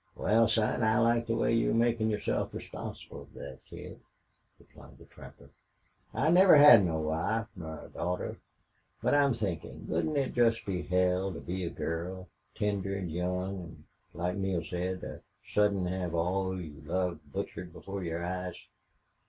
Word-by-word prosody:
"Wal, 115 Hz, +1 st, +3 dB
son, 110 Hz, +1 st, +1 dB
I 110 Hz, +1 st, +3 dB
like 115 Hz, 0 st, +3 dB
the 115 Hz, -, +1 dB
way 115 Hz, -, +2 dB
you're 115 Hz, 0 st, +2 dB
makin' 115 Hz, -1 st, +2 dB
yourself 105 Hz, -1 st, -1 dB
responsible -, -, -8 dB
fer -, -, -13 dB
thet -, -, -9 dB
kid," -, -, -10 dB, 0.6 s
replied -, -, -17 dB
the -, -, -15 dB
trapper. -, -, -14 dB, 0.6 s
"I 155 Hz, -, +2 dB
never 185 Hz, +1 st, +8 dB
had 145 Hz, -8 st, +9 dB
no 80 Hz, -3 st, 0 dB
wife 80 Hz, +9 st, 0 dB
nor 80 Hz, -4 st, -7 dB
daughter. 90 Hz, +1 st, -3 dB, 0.7 s
But -, -, +3 dB
I'm 140 Hz, -3 st, +4 dB
thinkin' 100 Hz, -7 st, -4 dB
wouldn't 155 Hz, -2 st, 0 dB
it 135 Hz, -2 st, 0 dB
jest 115 Hz, -2 st, +3 dB
be 95 Hz, -3 st, -2 dB
hell 90 Hz, +1 st, +1 dB
to 80 Hz, -, -6 dB
be 90 Hz, +1 st, -4 dB
a -, -, -2 dB
girl 90 Hz, +3 st, -4 dB, 0.3 s
tender 100 Hz, -2 st, -1 dB
an' 90 Hz, -4 st, -4 dB
young 90 Hz, +3 st, -2 dB
an' 85 Hz, -1 st, -11 dB, 0.3 s
like 90 Hz, +3 st, -2 dB
Neale 95 Hz, -3 st, -1 dB
said 90 Hz, +2 st, -3 dB
an' -, -, -7 dB, 0.3 s
sudden 105 Hz, -3 st, +3 dB
hev 90 Hz, -2 st, -2 dB
all 95 Hz, +2 st, 0 dB
you 75 Hz, -5 st, -9 dB
loved 85 Hz, -3 st, -2 dB
butchered 85 Hz, +4 st, -5 dB
before 95 Hz, +2 st, -6 dB
your 85 Hz, 0 st, -3 dB
eyes?" 90 Hz, 0 st, -3 dB
95 Hz, 160 wpm, -30 LUFS, 90-110 Hz, 0.7 s, had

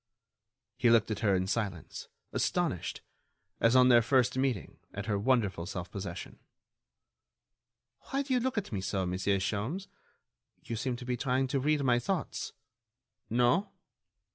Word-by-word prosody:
He 120 Hz, -, +4 dB
looked 115 Hz, -1 st, +4 dB
at 105 Hz, -, -2 dB
her 100 Hz, -3 st, +3 dB
in 95 Hz, 0 st, +1 dB
silence, 100 Hz, -4 st, -3 dB, 0.3 s
astonished, -, -, -1 dB, 0.6 s
as 115 Hz, +2 st, +4 dB
on 130 Hz, 0 st, +7 dB
their 120 Hz, -1 st, +7 dB
first 125 Hz, +1 st, +2 dB
meeting, 130 Hz, -, -1 dB, 0.2 s
at 100 Hz, 0 st, -4 dB
her 105 Hz, -3 st, 0 dB
wonderful 105 Hz, -7 st, +1 dB
self 90 Hz, -3 st, -5 dB
possession. 95 Hz, -3 st, -6 dB, 1.7 s
"Why 275 Hz, +1 st, 0 dB
do 270 Hz, -1 st, -2 dB
you 250 Hz, -, +4 dB
look 255 Hz, -1 st, -1 dB
at 210 Hz, -, -2 dB
me 100 Hz, -3 st, -2 dB
so, 95 Hz, 0 st, -1 dB
Monsieur 95 Hz, +2 st, +1 dB
Sholmes?... 110 Hz, -, -2 dB, 0.8 s
You 115 Hz, -, -4 dB
seem 125 Hz, +2 st, -2 dB
to 125 Hz, -, -8 dB
be 125 Hz, -1 st, -1 dB
trying 130 Hz, +1 st, +1 dB
to 135 Hz, -, +1 dB
read 150 Hz, +1 st, +1 dB
my 120 Hz, -2 st, +3 dB
thoughts.... 185 Hz, +3 st, -2 dB, 0.8 s
No?... 125 Hz, -, +3 dB
120 Hz, 150 wpm, -31 LUFS, 100-130 Hz, 1.7 s, on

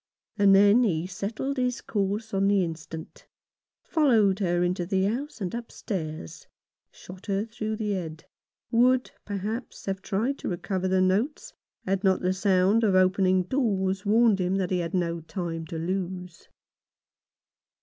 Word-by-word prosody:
And 200 Hz, -2 st, +5 dB
then 205 Hz, +4 st, +6 dB
he 170 Hz, -7 st, 0 dB
settled 215 Hz, +9 st, -4 dB
his 250 Hz, -1 st, 0 dB
course 205 Hz, +2 st, -2 dB
on 195 Hz, 0 st, +2 dB
the 200 Hz, -2 st, +3 dB
instant; 160 Hz, -1 st, -7 dB, 0.6 s
followed 225 Hz, -, +3 dB
her 175 Hz, -3 st, +1 dB
into 180 Hz, 0 st, 0 dB
the 190 Hz, +1 st, 0 dB
house 245 Hz, +8 st, -2 dB
and 185 Hz, -4 st, -3 dB
upstairs; 170 Hz, -, -6 dB, 0.4 s
shot 185 Hz, +1 st, -13 dB
her 200 Hz, +1 st, 0 dB
through 220 Hz, -1 st, -4 dB
the 215 Hz, -1 st, -2 dB
head— 165 Hz, -5 st, -5 dB, 0.5 s
would, 250 Hz, +2 st, +3 dB
perhaps, 210 Hz, +4 st, -5 dB
have 195 Hz, -1 st, -3 dB
tried 225 Hz, +9 st, -1 dB
to -, -, -4 dB
recover 185 Hz, +1 st, -2 dB
the 185 Hz, 0 st, +2 dB
notes, 200 Hz, +11 st, 0 dB, 0.3 s
had 195 Hz, +1 st, -1 dB
not 190 Hz, -1 st, +3 dB
the 185 Hz, +1 st, +1 dB
sound 195 Hz, +3 st, +3 dB
of 200 Hz, -4 st, +3 dB
opening 185 Hz, 0 st, +3 dB
doors 195 Hz, -5 st, 0 dB
warned 220 Hz, -1 st, +4 dB
him 180 Hz, +1 st, 0 dB
that 190 Hz, -2 st, -1 dB
he 180 Hz, -, +1 dB
had 170 Hz, +2 st, -3 dB
no 170 Hz, -2 st, 0 dB
time 165 Hz, 0 st, -5 dB
to 165 Hz, -, -5 dB
lose. 180 Hz, 0 st, -4 dB
195 Hz, 150 wpm, -26 LUFS, 180-215 Hz, 0.6 s, then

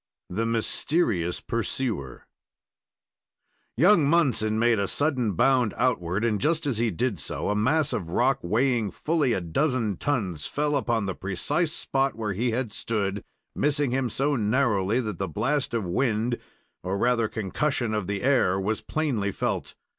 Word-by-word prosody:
THE 115 Hz, +5 st, -1 dB
MYSTERIOUS 115 Hz, -, 0 dB
PURSUER 115 Hz, -, -3 dB, 1.5 s
Young 175 Hz, -, +5 dB
Munson 125 Hz, -10 st, +2 dB
made 115 Hz, -1 st, +3 dB
a 100 Hz, -, 0 dB
sudden 130 Hz, -7 st, 0 dB
bound 125 Hz, +3 st, +2 dB
outward, 105 Hz, -5 st, 0 dB
and, 105 Hz, -4 st, 0 dB
just 165 Hz, 0 st, +1 dB
as 130 Hz, -6 st, 0 dB
he 115 Hz, 0 st, +2 dB
did 105 Hz, 0 st, -1 dB
so, 70 Hz, -, -3 dB
a -, -, 0 dB
mass 130 Hz, +7 st, +2 dB
of 95 Hz, -8 st, -3 dB
rock 125 Hz, +9 st, +2 dB
weighing 115 Hz, +3 st, +1 dB
fully 150 Hz, -3 st, 0 dB
a -, -, -1 dB
dozen 110 Hz, -, 0 dB
tons, 95 Hz, -, -2 dB
fell 150 Hz, 0 st, 0 dB
upon 120 Hz, -6 st, 0 dB
the 95 Hz, -, -2 dB
precise 145 Hz, -, -1 dB
spot 135 Hz, -4 st, 0 dB
where 110 Hz, -3 st, -3 dB
he 120 Hz, +6 st, 0 dB
had 115 Hz, -2 st, -2 dB
stood, 100 Hz, -3 st, -2 dB, 0.3 s
missing 145 Hz, -3 st, +1 dB
him 130 Hz, -1 st, 0 dB
so 140 Hz, +5 st, 0 dB
narrowly 110 Hz, -2 st, +1 dB
that 105 Hz, -6 st, -5 dB
the 95 Hz, -, -1 dB
blast 130 Hz, -, -1 dB
of 115 Hz, -4 st, -1 dB
wind, 115 Hz, +4 st, 0 dB, 0.4 s
or 95 Hz, +2 st, -2 dB
rather 120 Hz, +1 st, +2 dB
concussion 115 Hz, -, -1 dB
of 105 Hz, -4 st, -2 dB
the 100 Hz, 0 st, -3 dB
air, 120 Hz, -9 st, +3 dB
was 105 Hz, +3 st, -1 dB
plainly 125 Hz, -11 st, -1 dB
felt. -, -, -3 dB
115 Hz, 155 wpm, -26 LUFS, 100-135 Hz, 1.5 s, Young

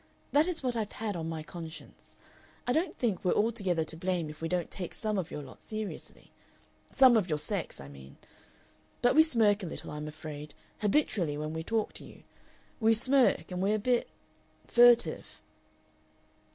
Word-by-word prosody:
That 295 Hz, +4 st, +4 dB
is 335 Hz, -5 st, -3 dB
what 250 Hz, -2 st, -1 dB
I've 215 Hz, -3 st, -3 dB
had 215 Hz, -3 st, -3 dB
on 165 Hz, -1 st, -3 dB
my 160 Hz, -1 st, -4 dB
conscience.... 165 Hz, 0 st, -10 dB, 0.5 s
I 245 Hz, -, +1 dB
don't 320 Hz, +2 st, 0 dB
think 220 Hz, -7 st, -1 dB
we're 180 Hz, -, +3 dB
altogether 200 Hz, -7 st, +1 dB
to 155 Hz, +1 st, -8 dB
blame 170 Hz, -2 st, -2 dB
if 155 Hz, -, -14 dB
we 165 Hz, -, -1 dB
don't 175 Hz, -1 st, -2 dB
take 180 Hz, -3 st, -6 dB
some 215 Hz, -2 st, -1 dB
of 175 Hz, -, -4 dB
your 150 Hz, -, -6 dB
lot 130 Hz, -, -13 dB
seriously. 215 Hz, -2 st, -7 dB, 0.6 s
Some 260 Hz, -3 st, +7 dB
of 200 Hz, -5 st, +2 dB
your 155 Hz, -, +1 dB
sex, 190 Hz, +4 st, -3 dB
I 70 Hz, -, -9 dB
mean. 70 Hz, -1 st, -13 dB, 0.9 s
But 245 Hz, -, +5 dB
we 315 Hz, -, +8 dB
smirk 225 Hz, -9 st, +3 dB
a 185 Hz, -, -4 dB
little, -, -, -7 dB
I'm 150 Hz, 0 st, -5 dB
afraid, 150 Hz, -1 st, -8 dB, 0.2 s
habitually 200 Hz, -, +1 dB
when 155 Hz, +1 st, -4 dB
we 160 Hz, -, -3 dB
talk 220 Hz, +4 st, -1 dB
to -, -, -7 dB
you. -, -, -14 dB, 0.6 s
We 225 Hz, -1 st, +4 dB
smirk, 255 Hz, -, +3 dB
and 180 Hz, 0 st, -3 dB
we're 200 Hz, +3 st, +2 dB
a -, -, +1 dB
bit 240 Hz, +3 st, +1 dB, 0.6 s
furtive." 240 Hz, 0 st, +4 dB
195 Hz, 180 wpm, -30 LUFS, 160-230 Hz, 0.9 s, we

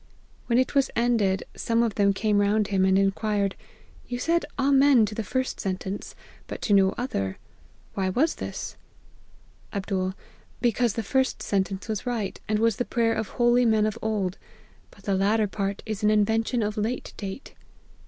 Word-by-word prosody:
When 235 Hz, -, +2 dB
it 255 Hz, -, +2 dB
was 275 Hz, -2 st, +3 dB
ended, 225 Hz, -5 st, +2 dB
some 230 Hz, 0 st, +1 dB
of 230 Hz, -3 st, 0 dB
them 200 Hz, -1 st, +3 dB
came 205 Hz, +1 st, +1 dB
round 205 Hz, +1 st, +2 dB
him, 190 Hz, -2 st, +2 dB
and 190 Hz, 0 st, +4 dB
inquired, 200 Hz, 0 st, +1 dB, 0.3 s
' -, -, -26 dB
You 245 Hz, -, -3 dB
said 335 Hz, +7 st, +1 dB
Amen 275 Hz, -3 st, +5 dB
to 210 Hz, -, -6 dB
the 225 Hz, -, -3 dB
first 260 Hz, +5 st, -2 dB
sentence, 190 Hz, +1 st, -4 dB, 0.3 s
but -, -, -6 dB
to 210 Hz, -, +2 dB
no 190 Hz, -1 st, +4 dB
other; 100 Hz, -, -2 dB, 0.6 s
why 190 Hz, -1 st, 0 dB
was 290 Hz, -, +2 dB
this -, -, -6 dB, 0.2 s
?' -, -, -30 dB
" -, -, -31 dB
Md. 190 Hz, -2 st, -2 dB, 0.2 s
' -, -, -31 dB
Because 240 Hz, -1 st, +1 dB
the 225 Hz, -, -3 dB
first 265 Hz, +5 st, 0 dB
sentence 195 Hz, 0 st, -1 dB
was 215 Hz, 0 st, -3 dB
right, 225 Hz, -5 st, -2 dB
and 215 Hz, -, +1 dB
was 225 Hz, -1 st, +2 dB
the -, -, 0 dB
prayer 230 Hz, -2 st, +1 dB
of 220 Hz, -, -2 dB
holy 240 Hz, 0 st, +3 dB
men 220 Hz, -2 st, +3 dB
of 215 Hz, +1 st, -2 dB
old; 205 Hz, -4 st, -1 dB, 0.5 s
but 200 Hz, -, -20 dB
the 200 Hz, -, 0 dB
latter 205 Hz, +3 st, +2 dB
part 200 Hz, 0 st, -3 dB
is 215 Hz, -2 st, -4 dB
an 210 Hz, -, +3 dB
invention 220 Hz, +3 st, +2 dB
of 210 Hz, 0 st, -2 dB
late 225 Hz, +4 st, -2 dB
date.' 200 Hz, +5 st, -7 dB
215 Hz, 185 wpm, -26 LUFS, 195-240 Hz, 0.6 s, Amen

